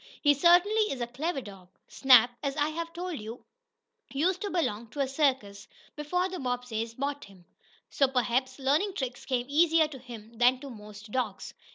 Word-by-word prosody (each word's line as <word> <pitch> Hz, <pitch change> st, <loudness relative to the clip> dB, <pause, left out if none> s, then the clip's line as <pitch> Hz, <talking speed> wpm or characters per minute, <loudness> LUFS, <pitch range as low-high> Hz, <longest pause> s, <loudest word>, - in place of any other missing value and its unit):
He 290 Hz, -1 st, +6 dB
certainly 360 Hz, +8 st, +4 dB
is 270 Hz, -, -4 dB
a 240 Hz, -, -1 dB
clever 275 Hz, +5 st, -3 dB
dog!" 195 Hz, -5 st, -13 dB, 0.2 s
Snap, 250 Hz, -3 st, +5 dB
as 280 Hz, -1 st, -3 dB
I 295 Hz, 0 st, +1 dB
have 335 Hz, +1 st, -5 dB
told 350 Hz, -3 st, -5 dB
you, 225 Hz, +3 st, -9 dB, 0.7 s
used 340 Hz, +7 st, 0 dB
to 410 Hz, -, -2 dB
belong 235 Hz, -, -2 dB
to 290 Hz, -, -10 dB
a 275 Hz, -, +1 dB
circus 260 Hz, -8 st, -1 dB, 0.3 s
before 360 Hz, +5 st, -1 dB
the 370 Hz, -1 st, -6 dB
Bobbseys 245 Hz, -3 st, -3 dB
bought 280 Hz, +2 st, -3 dB
him, 190 Hz, -3 st, -18 dB, 0.5 s
so 275 Hz, -, +3 dB
perhaps 255 Hz, 0 st, 0 dB
learning 295 Hz, +9 st, +1 dB
tricks 255 Hz, -5 st, -4 dB
came 250 Hz, -2 st, -1 dB
easier 320 Hz, +2 st, +4 dB
to 270 Hz, -3 st, -10 dB
him 230 Hz, -2 st, -12 dB
than 250 Hz, +1 st, +4 dB
to 280 Hz, -2 st, -8 dB
most 210 Hz, -1 st, -12 dB
dogs. 255 Hz, +1 st, -3 dB
265 Hz, 180 wpm, -28 LUFS, 240-315 Hz, 0.7 s, He